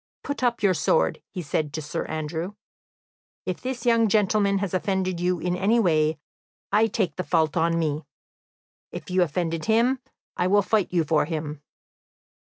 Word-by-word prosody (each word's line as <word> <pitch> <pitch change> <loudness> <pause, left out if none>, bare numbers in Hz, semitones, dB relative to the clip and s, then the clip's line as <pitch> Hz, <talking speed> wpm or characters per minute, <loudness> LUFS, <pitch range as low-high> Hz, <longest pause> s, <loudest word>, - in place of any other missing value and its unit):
"Put 285 -2 -4
up 240 -3 0
your 195 -2 +5
sword," 480 - +1
he 180 -4 -6
said 150 0 -1
to 155 - -3
Sir 150 - -3
Andrew. 160 +5 -4 0.9
"If 185 -1 -3
this 250 -2 -4
young 230 -2 +4
gentleman 200 -1 +2
has 195 -2 -2
offended 185 -1 0
you 180 0 0
in 180 +2 -1
any 205 +6 +2
way, 155 -6 +2 0.5
I 215 +2 +4
take 210 -4 -1
the 185 - -1
fault 160 -4 +1
on 165 0 +2
me. 155 -2 -1 0.8
If - - -8
you 185 0 +3
offend 170 0 0
him, 235 +4 +3 0.4
I 180 - +1
will 205 +2 +4
fight 210 -1 +1
you 175 -2 +2
for 155 0 +2
him." 155 -2 -4
180 Hz, 165 wpm, -25 LUFS, 160-210 Hz, 0.9 s, your